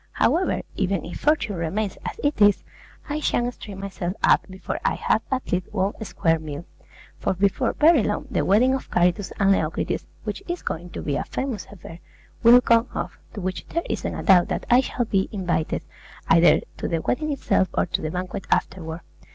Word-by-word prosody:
However, 370 +3 +1
even 195 -3 -1
if 175 - -7
fortune 235 - +1
remains 190 +5 -2
as - - -6
it 290 -6 0
is, 205 -1 +5 0.4
I 300 0 -2
shan't 245 -4 0
string 200 -5 -9
myself 190 -2 -4
up - - +4
before 190 0 -5
I - - +1
have 220 - +1
at 260 -1 -2
least 180 0 -1
one 195 -1 0
square 165 -4 +1
meal; 155 +1 -7 0.5
for - - 0
before 195 +1 +1
very 310 -3 +5
long, 210 0 -1
the - - +1
wedding 240 +7 +4
of 265 - -3
Charitus 180 +2 +1
and 195 0 +4
Leocritis, 160 -5 -1 0.2
which - - -4
is 350 0 -4
going 175 +2 -4
to - - -5
be 145 -2 -1
a - - -1
famous 255 -7 -4
affair, 175 -4 -11 0.4
will 245 +1 +8
come 230 0 +3
off, - - -4 0.2
to 205 - -5
which 185 0 -4
there 335 - -2
isn't - - -3
a - - -5
doubt 180 -3 +6
that - - -3
I 245 +2 +7
shall 245 -2 -2
be 195 -3 0
invited, 175 -6 -1 0.4
either 165 +1 +6 0.2
to - - -3
the 165 -2 -1
wedding 305 +4 -1
itself 270 -8 +1
or - - +2
to - - -2
the 155 - -2
banquet 180 +3 -5
afterward. 165 -3 -1
195 Hz, 195 wpm, -24 LUFS, 175-240 Hz, 0.5 s, will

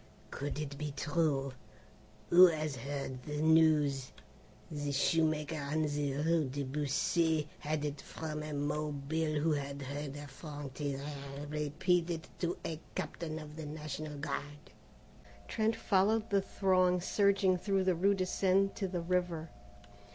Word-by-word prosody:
"Could 145 +2 -3
it 145 -2 -5
be 150 -1 -3
true? 145 -4 +1 0.8
Who 180 +1 +10
has 155 -4 -1
heard 135 0 -4
the 150 +3 -4
news? 155 -4 +4 0.6
The 145 -1 -2
shoemaker 155 +2 +1
on 150 +2 0
the 145 -2 0
rue 155 0 +2
de 140 +2 -3
Buci 150 +3 +1
had 150 0 -1
it 145 -1 -4
from 155 -1 -5
a 150 0 -5
Mobile 150 +1 -1
who 160 +2 +2
had 140 -1 -2
heard 140 +1 -5
a 145 0 -7
Franctireur 140 -1 -6
repeat 155 +4 +1
it 165 0 -3
to 175 0 -1
a 160 -1 -3 0.2
captain 160 -2 -3
of 150 -1 -8
the 160 -2 -5
National 150 0 -5
Guard." 145 +2 -5 0.8
Trent 220 0 +1
followed 210 +3 +2
the 200 -1 +4
throng 185 -2 +2
surging 195 0 +3
through 195 0 +1
the 185 -1 +3
rue 195 +4 +3
de 185 -1 0
Seine 195 +1 +3
to 195 - -2
the 180 -2 -2
river. 170 -2 -1
155 Hz, 145 wpm, -33 LUFS, 145-175 Hz, 0.8 s, Who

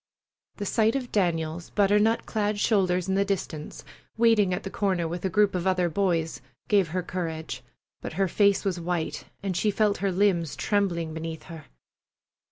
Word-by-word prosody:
The 205 - -5
sight 220 +3 +2
of 255 -3 -3
Daniel's 170 -3 -1
butter 205 0 +3
nut 225 +2 +2
clad 210 -1 -1
shoulders 185 -4 +2
in 190 - 0
the 195 +1 +3
distance, 180 -6 -4 0.3
waiting 225 -4 +4
at 180 - -2
the 195 - -5
corner 185 -5 0
with 175 +2 -5
a - - +1
group 205 +2 +3
of 180 0 -1
other 180 -2 +2
boys, 165 -4 0 0.3
gave 200 -4 +3
her 180 +3 -2
courage, 165 -3 -4 0.4
but - - -6
her 195 0 +1
face 200 +2 +3
was 185 -3 0
white, 170 -1 -3 0.2
and 190 -2 -2
she 210 - +2
felt 210 0 +2
her 195 -1 0
limbs 180 -4 +1
trembling 175 -6 0
beneath 160 -1 -5
her. 160 -1 -10
190 Hz, 175 wpm, -26 LUFS, 170-205 Hz, 0.4 s, waiting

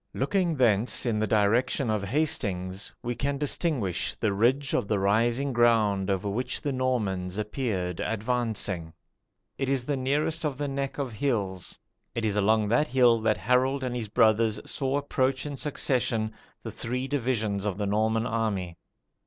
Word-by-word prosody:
Looking 170 +4 0
thence 120 -3 +3
in 110 -3 0
the 110 - 0
direction 110 +4 +2
of 105 -2 -1
Hastings, 100 - -1
we 120 0 -2
can 140 +4 -2
distinguish 140 - 0
the 110 -3 0
"ridge 130 +7 +1
of - - 0
the 105 - +1
rising 115 +7 +1
ground 110 -5 +3
over 100 +1 -1
which 120 +5 -2
the 145 - -2
Normans 105 -8 -1
appeared 105 -5 -2
advancing." 110 -7 -1 0.7
It 135 -1 -1
is 135 -3 0
the 145 - 0
nearest 150 +5 0
of 145 -4 -2
the 145 0 -2
neck 135 0 -3
of 135 -5 -3
hills. 100 -7 -2 0.4
It 115 - -1
is 105 -2 0
along 105 +1 +2
that 135 +7 +3
hill 120 -2 +4
that 110 -1 +1
Harold 130 +4 +1
and 125 -1 -2
his 115 -3 -3
brothers 110 +1 +3
saw 135 0 -1
approach 135 -1 0
in 145 -1 -4
succession 120 -6 -1 0.3
the - - -5
three 125 +3 -3
divisions 110 -7 -1
of 100 -2 -2
the 105 - -1
Norman 110 +2 +1
army. 100 -7 -2
115 Hz, 160 wpm, -27 LUFS, 105-135 Hz, 0.7 s, hill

